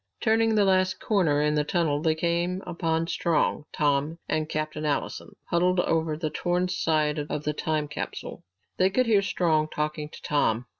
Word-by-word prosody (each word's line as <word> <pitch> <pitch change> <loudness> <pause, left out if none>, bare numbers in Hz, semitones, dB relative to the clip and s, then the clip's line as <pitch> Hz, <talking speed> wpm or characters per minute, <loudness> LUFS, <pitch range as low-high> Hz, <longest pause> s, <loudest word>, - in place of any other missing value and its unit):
Turning 225 -1 +2
the 205 -1 +4
last 185 -1 +2
corner 160 -9 +2
in 150 0 +2
the 150 0 +2
tunnel 150 -2 0
they 160 -1 +2
came 170 +2 0
upon 165 -1 -1
Strong, 165 -3 0
Tom, 145 +2 0
and 155 0 -1
Captain 155 0 -3
Allison 150 -2 -3 0.2
huddled 180 +2 +2
near 160 -3 +1
the 155 -1 -3
torn 175 +3 0
side 155 -4 +1
of 150 - -3
the 150 - -1
time 155 0 -1
capsule. 150 - -6 0.3
They 185 - +4
could 255 +6 +2
hear 215 -4 +4
Strong 160 -5 +1
talking 150 0 -3
to - - -12
Tom. 125 -5 +1
160 Hz, 170 wpm, -26 LUFS, 150-180 Hz, 0.3 s, the